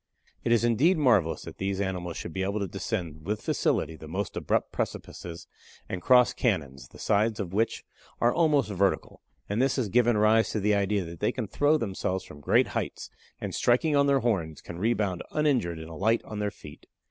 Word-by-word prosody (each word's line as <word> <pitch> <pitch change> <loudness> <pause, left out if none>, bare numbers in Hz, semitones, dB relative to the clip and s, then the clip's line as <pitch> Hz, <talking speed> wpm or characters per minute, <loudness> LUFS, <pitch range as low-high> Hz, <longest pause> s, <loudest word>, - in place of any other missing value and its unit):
It 115 - 0
is 120 -1 +4
indeed 130 - +3
marvelous 105 - +2
that - - -10
these 95 0 -1
animals 90 -4 -3
should 85 - -6
be 95 - -2
able 100 +2 -1
to 100 - -2
descend 90 -5 -4
with 105 +5 -2
facility 80 - 0
the 80 0 -11
most 95 +3 -3
abrupt - - 0
precipices 85 -1 -5 0.4
and 90 - -4
cross 125 +3 +5
canons, 70 - -1
the - - -16
sides 110 +2 +1
of 95 -3 -4
which 110 +3 0 0.4
are 120 +1 +3
almost 150 -9 +2
vertical, 100 0 0 0.3
and 105 +4 0
this 135 0 +2
has 125 -6 -1
given 120 +1 +3
rise 110 +1 +4
to 110 - 0
the 105 +1 +2
idea 100 -1 +1
that 85 0 -9
they 105 - +1
can 125 - -3
throw 145 +9 +2
themselves 95 -5 -2
from 75 - -12
great - - +3
heights, - - -4 0.3
and - - -5
striking 145 +6 +2
on 140 0 +4
their 140 -1 +3
horns, 90 -10 -1
can 85 - -9
rebound 105 -4 0
uninjured 130 - +1
and 80 +1 -8
alight 110 +8 +1
on 105 - -6
their 105 0 0
feet. 75 -6 -13
105 Hz, 200 wpm, -27 LUFS, 90-120 Hz, 0.4 s, cross